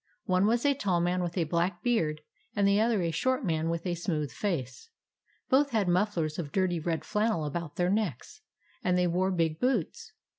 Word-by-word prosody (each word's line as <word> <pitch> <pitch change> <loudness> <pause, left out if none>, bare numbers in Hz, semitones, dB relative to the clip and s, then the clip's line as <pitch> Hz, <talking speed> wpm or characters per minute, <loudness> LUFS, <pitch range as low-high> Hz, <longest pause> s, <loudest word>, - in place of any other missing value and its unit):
One 185 +1 +3
was 235 +4 +1
a 285 - +5
tall 195 -10 0
man 175 +1 +1
with 175 +1 -3
a 175 - +3
black 170 +3 -1
beard, 160 -11 +1 0.3
and 200 -1 +3
the 200 +1 +4
other 220 -4 +2
a 165 - 0
short 260 +9 0
man 160 -2 0
with 170 +1 -3
a 180 - 0
smooth 160 - -2
face. 155 - -3 0.6
Both 280 +2 +3
had 220 -6 +1
mufflers 175 -4 0
of 150 -4 -4
dirty 185 -2 +1
red 160 0 -2
flannel 210 -6 0
about 150 +1 -4
their 180 +1 +1
necks, 205 - -2 0.4
and 180 0 +2
they 180 - +3
wore 180 +2 +1
big 165 -4 0
boots. 245 -8 -1
180 Hz, 195 wpm, -29 LUFS, 165-210 Hz, 0.6 s, a